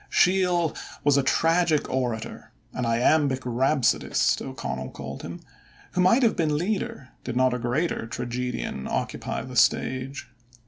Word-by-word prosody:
Sheil 180 -3 +3 0.3
was 145 -1 +4
a 140 - +4
tragic 165 +3 +2
orator 120 -4 -3 0.2
"an 125 -2 -2
iambic 130 +3 +2
rhapsodist", 130 +2 +2
O'Connell 65 0 -5
called - - -8
him - - -8 0.5
who 180 - 0
might 230 +9 +4
have 230 - +3
been 150 -2 +1
leader, 175 -7 -3
did 120 - -4
not 130 0 +3
a 125 - -2
greater 125 +1 -1
tragedian 120 - -4
occupy - - -3
the - - -9
stage. 130 +1 +1
135 Hz, 135 wpm, -25 LUFS, 125-165 Hz, 0.5 s, was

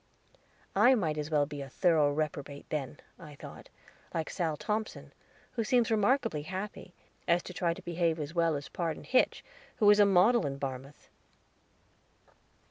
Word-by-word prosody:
"I 240 +7 +6
might 160 -9 -1
as 150 0 -4
well 150 -2 +2
be 145 -1 -7
a 135 - -7
thorough 155 -2 +3
reprobate 145 -1 -4
then," 145 -2 -4 0.2
I 150 -3 -11
thought, - - -11 0.5
"like 160 -2 -2
Sal 160 -4 -2
Thompson, 215 +4 -4 0.4
who 230 - -2
seems 235 0 +2
remarkably 220 - +2
happy, 185 +2 -7 0.3
as 170 +1 +3
to 180 - -8
try 170 -1 0
to - - -12
behave 170 -1 0
as 150 +1 -5
well 165 -2 +2
as 140 0 -5
Pardon 165 -3 -4
Hitch, 255 - +1 0.3
who 210 - +2
is 210 - +4
a 205 - +7
model 200 +3 +4
in 135 0 -4
Barmouth." 135 +1 -7
165 Hz, 160 wpm, -30 LUFS, 145-205 Hz, 0.5 s, a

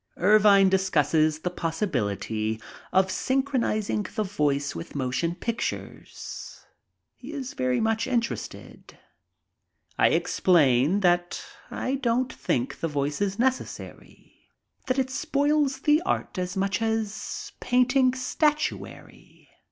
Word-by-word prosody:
Ervine 200 0 +6
discusses 160 -4 +2
the 180 - -2
possibility 110 - -2 0.3
of 190 0 +3
synchronizing 255 -3 0
the 215 - +1
voice 145 -7 0
with 85 - -8
motion 140 +6 -1
pictures. 230 +6 -6 0.5
He 265 +4 -11
is 270 -4 -5
very 130 -1 0
much 225 0 0
interested. 235 -3 -4 1.0
I - - +6
ex - - -1
plain 155 +1 +4
that 175 -1 +1 0.2
I 260 - -3
don't 250 +1 +1
think 125 +1 -2
the 165 - -1
voice 145 +1 -2
is 200 -1 0
necessary, 260 +2 -4 0.4
that 255 0 0
it 260 -1 0
spoils 290 -1 +1
the 300 +3 +4
art 345 - -2
as 180 +2 -3
much 195 +2 0
as 220 -2 -3
painting 250 +1 +3
statuary. 300 +4 -3
205 Hz, 115 wpm, -26 LUFS, 160-255 Hz, 1.0 s, Ervine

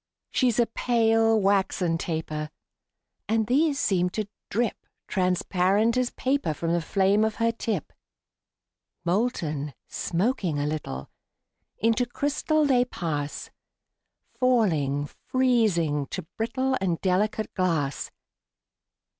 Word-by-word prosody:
She's 245 -4 +2
a 240 - +5
pale, 225 -1 +2
waxen 190 -4 +1
taper; 155 -2 -3 0.8
And 220 0 +2
these 280 +5 +2
seem 180 -3 +2
to 215 -2 -1 0.2
drip 230 +1 -1 0.2
Transparent 190 +4 +2
as 255 -1 +1
paper 260 - -1
From 165 +2 -1
the 170 - +1
flame 195 +4 +2
of 220 -1 0
her 230 0 +2
tip. 220 -7 -3 1.1
Molten, 170 - -1
smoking 180 - -1
a 145 - 0
little, 150 - -4 0.7
Into 230 +2 +2
crystal 295 +4 0
they 255 -3 +4
pass; 150 -11 -4 0.9
Falling, 160 - +2
freezing, 185 - +1
to 185 - -5
brittle 260 +4 0
And 175 -4 0
delicate 200 +3 0
glass. 160 -7 -1
200 Hz, 105 wpm, -26 LUFS, 165-235 Hz, 1.1 s, a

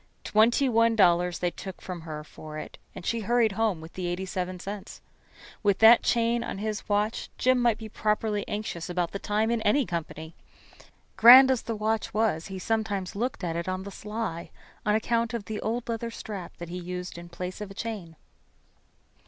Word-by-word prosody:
Twenty 235 +6 +3
one 230 -1 +3
dollars 180 -3 +4
they 175 -1 -1
took 190 +1 -8
from 180 -2 -7
her 155 -2 -6
for 155 0 -10
it, - - -8 0.2
and - - -8
she 230 - 0
hurried 230 +1 +2
home 200 -4 0
with 160 +1 -11
the 185 -1 -4
eighty 175 +2 -2
seven 185 -1 -4
cents. 200 +2 -7 0.6
With 200 -2 +2
that 225 +2 +8
chain 235 0 +1
on - - -5
his 215 +1 -4
watch 210 +2 0
Jim 255 0 +3
might 235 -3 +3
be 220 - -8
properly 210 -1 -1
anxious 205 -5 -4
about 175 -1 -1
the 200 - -4
time 215 +3 0
in 235 -1 0
any 255 +6 +3
company. 160 -2 -5 0.8
Grand 260 +3 +10
as 255 - +1
the 230 - -4
watch 215 +1 -1
was, 210 -7 +1
he 195 -1 -6
sometimes 205 -2 -2
looked 240 -1 -3
at 165 -2 -2
it 170 +2 -3
on 185 0 -3
the 200 - -8
sly 210 -4 -5 0.4
on 210 - +4
account 230 +1 0
of 215 -4 -4
the 215 -1 -5
old 235 +2 -2
leather 230 0 -3
strap 205 -5 -7
he 175 +1 -6
used 180 0 -6
in 170 0 -9
place 180 +3 -6
of 210 - -5
a 195 - -11
chain. 205 -8 -5
210 Hz, 195 wpm, -27 LUFS, 180-225 Hz, 0.8 s, Grand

